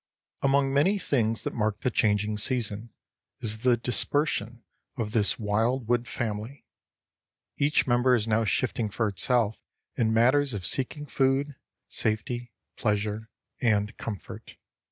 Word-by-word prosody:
Among 135 0 +2
many 180 +9 +3
things 115 - 0
that - - -3
mark 105 -2 -1
the 125 - 0
changing 105 -1 +1
season, 110 -1 0 0.5
is 110 -2 0
the 120 +1 +3
dispersion 120 0 -1 0.3
of 110 -3 -2
this 105 -2 +2
wildwood 120 +3 0
family. 110 +3 -4 0.9
Each 145 +2 +3
member 125 0 +3
is 115 -2 0
now 110 +1 +2
shifting 110 +1 0
for 110 +2 -1
itself 110 +2 +1 0.3
in 110 -2 +1
matters 130 +3 +3
of 95 -3 -4
seeking 135 - -1
food, 135 +1 +1 0.3
safety, 120 +2 -2 0.3
pleasure, 105 +1 -1 0.3
and 105 -2 +1
comfort. 105 -5 -7
115 Hz, 125 wpm, -27 LUFS, 105-130 Hz, 0.9 s, many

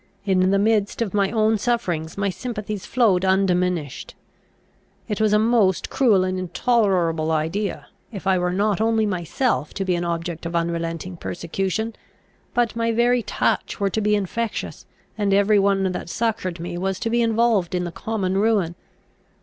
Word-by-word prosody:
In 185 -2 +3
the 195 - +3
midst 210 +1 +1
of 205 - -6
my 200 -2 +2
own 220 -1 +2
sufferings 180 -9 -1
my 200 -1 0
sympathies 210 -1 -5
flowed 210 -7 +3
undiminished. 180 -5 0 0.9
It 210 0 -2
was 215 -1 +3
a 210 - +5
most 215 -4 +2
cruel 215 -8 +4
and 185 0 -1
intolerable 180 -4 +1
idea, 165 +6 -2 0.3
if 200 -3 -8
I 190 -1 +3
were 180 0 0
not 205 +2 +1
only 225 -1 +2
myself 185 - -1
to 195 - -2
be 185 - +1
an 175 0 -1
object 170 0 -3
of 170 - -5
unrelenting 170 +1 -2
persecution, 195 +7 -3 0.6
but 235 -2 +1
my 230 0 0
very 240 +2 +3
touch - - -1
were 200 -1 0
to 220 - -1
be 210 0 +2
infectious, 210 +3 -3 0.3
and 200 -1 +2
every 200 +1 +4
one 195 -1 +2
that 180 - -5
succoured 205 -5 -2
me 175 +1 -5
was 190 0 -2
to 225 - -2
be 235 0 +2
involved 225 -5 +2
in 180 - 0
the 175 - -4
common 195 -1 -2
ruin. 205 -6 +2
195 Hz, 165 wpm, -22 LUFS, 180-220 Hz, 0.9 s, a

